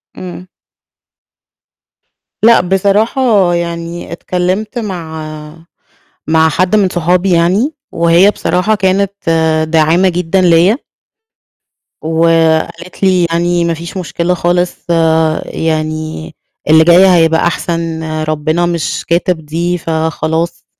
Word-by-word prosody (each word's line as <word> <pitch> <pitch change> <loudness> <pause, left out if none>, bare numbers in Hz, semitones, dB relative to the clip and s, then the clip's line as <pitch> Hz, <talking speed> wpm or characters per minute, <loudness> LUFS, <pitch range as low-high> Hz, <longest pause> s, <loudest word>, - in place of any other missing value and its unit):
امم. 185 0 -9 2.0
لأ، 230 +1 +6
بصراحة 200 +1 +1
يعني 170 0 -4
اتكلِمت 185 +7 -3
مع 160 -5 -7 0.6
مع 160 0 +3
حَدّ 180 +6 +1
من 200 -3 +2
صحابي 180 +2 0
يعني، 185 - +2 0.2
وهي 170 +4 +4
بصراحة 205 +1 0
كانت 195 0 0 0.6
داعِمة 165 +3 +3
جدًا 180 +1 0
ليَّ. 175 +4 +4 1.3
وقالت 165 +2 0
لي 185 -2 +3
يعني: 170 +1 0
"ما 170 - 0
فيش 170 +3 -8
مُشكلة 180 -1 -2
خالص 175 0 0 0.7
يعني، 155 - -4 0.3
اللي 160 +1 +6
جاي 175 +3 +6
هيبقى 165 -2 +3
أحسن، 165 -1 -3 0.2
ربنا 155 +2 -1
مش 170 -2 -3
كاتب 170 -2 -1
دي 170 +3 -2
فخلاص. 160 0 -2
170 Hz, 100 wpm, -13 LUFS, 160-185 Hz, 2.0 s, لأ